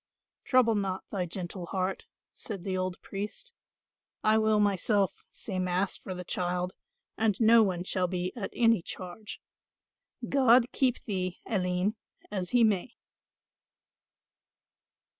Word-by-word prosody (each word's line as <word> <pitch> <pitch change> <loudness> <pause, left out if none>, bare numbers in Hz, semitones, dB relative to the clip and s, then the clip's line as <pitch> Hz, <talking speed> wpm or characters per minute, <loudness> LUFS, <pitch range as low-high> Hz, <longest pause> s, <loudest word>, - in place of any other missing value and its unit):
Grief. - - -20
"Trouble 255 -3 +5
not 195 -3 -1
thy 185 -4 -1
gentle 175 0 -5
heart," 190 +1 -2 0.3
said 200 -6 -6
the 190 -1 -2
old 185 0 -2
priest, 210 - -6 0.7
"I 215 0 +4
will 215 -1 +3
myself 200 -1 +2 0.2
say 190 -4 -4
mass 185 +1 0
for 185 - -7
the 180 - -6
child, 180 +1 -2 0.5
and 215 -3 +2
no 230 0 +7
one 185 -4 +1
shall 185 0 0
be 180 0 -2
at 210 -5 -4
any 230 -5 +4
charge. 185 +5 -7 0.8
God 255 -2 +5
keep 255 -3 +1
thee, 185 -4 -2
Aline, 185 +1 0 0.3
as 185 -3 -2
he 245 -1 +4
may." 215 +1 +1
195 Hz, 130 wpm, -29 LUFS, 180-220 Hz, 0.8 s, no